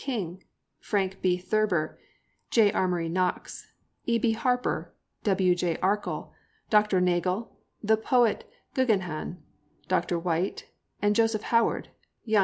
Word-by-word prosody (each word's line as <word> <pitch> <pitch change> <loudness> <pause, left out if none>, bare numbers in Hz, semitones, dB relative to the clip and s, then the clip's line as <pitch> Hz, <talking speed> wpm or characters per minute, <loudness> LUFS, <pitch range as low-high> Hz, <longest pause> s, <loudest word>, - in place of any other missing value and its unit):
King, 190 -9 -4 0.4
Frank 195 -2 -1
B. 180 -1 +2
Thurber, 185 -3 0 0.5
J. 220 -3 +5
Amory 175 -3 0
Knox, 180 +2 -2 0.4
E.B. 235 -1 +2
Harper, 250 +2 -1 0.3
W.J. 180 -4 +2
Arkell, 205 +3 -1 0.4
Dr. 210 -3 +4
Nagle, 180 +4 0 0.3
the 220 +1 +4
poet 235 0 +2 0.3
Geogheghan, 190 -10 0 0.5
Doc - - +1
White, 175 +1 -1 0.4
and 205 0 +3
Joseph 225 -1 +2
Howard, 230 0 +2 0.4
jun. 215 -1 +4
195 Hz, 105 wpm, -27 LUFS, 180-220 Hz, 0.5 s, J